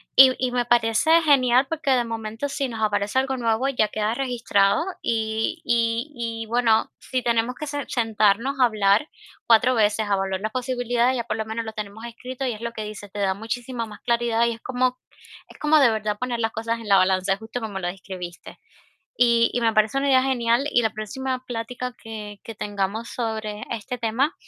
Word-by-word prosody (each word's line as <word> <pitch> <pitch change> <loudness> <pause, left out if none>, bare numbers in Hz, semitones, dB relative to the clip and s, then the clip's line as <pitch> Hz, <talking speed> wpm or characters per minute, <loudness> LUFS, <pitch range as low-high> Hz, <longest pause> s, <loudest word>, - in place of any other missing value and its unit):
Y 260 -1 +9
y 255 -1 0
me 245 -1 +1
parece 240 +8 +4
genial 260 -3 +4
porque, 315 -3 -1
de 250 -2 +3
momento, 225 +3 -4
si 275 -1 -2
nos 225 -2 -6
aparece 205 +3 +1
algo 265 0 -1
nuevo, 230 +2 +1
ya 220 -6 +1
queda 215 +1 -1
registrado 240 - +1 0.2
y 220 +7 -1
y 235 +3 +1
y 230 -1 -4
bueno, 225 -1 +2
si 255 -1 -2
tenemos 235 +1 +1
que 300 - -6
se-sentarnos 235 -2 0
a 250 - +8
hablar 210 +4 +2 0.4
4 235 +3 +5
veces 215 0 +2
a 200 - +2
valorar 195 0 -2
las 215 0 -2
posibilidades, 245 -1 0
ya 235 - -1
por - - -2
lo 220 - -2
menos 225 +1 -4
lo 220 - -6
tenemos 215 +1 -7
escrito 250 +3 -6
y 245 - -1
es 215 - -10
lo 235 0 -3
que 220 -2 -6
dices, 205 -1 -9
te 205 - -6
da 195 -1 +2
muchísima 230 +3 -4
más 210 -1 -11
claridad 235 -1 +1
y 235 - +1
es 225 - -12
como 255 0 0 0.5
es - - -15
como 305 +1 +4
de 250 -5 +5
verdad 215 -1 -2
poner 245 0 -3
las 225 -1 0
cosas 230 +1 -2
en 225 - -9
la 200 - +5
balanza, 185 +1 +2
justo 225 +3 -6
como 205 -4 -4
lo 175 - -3
describiste. 180 -1 -8 0.6
Y 235 -1 +4
y 245 - 0
me 225 -1 +2
parece 215 +5 +2
una 280 - 0
idea 260 -1 +5
genial 245 0 +1
y 240 - +4
la 220 - +1
próxima 255 +4 -4
plática 245 +1 -4
que 210 -2 -8
que 225 - -7
tengamos 205 +3 -3
sobre 220 -3 -4
este 235 +2 -4
tema 240 +8 0
230 Hz, 205 wpm, -24 LUFS, 215-250 Hz, 0.6 s, Y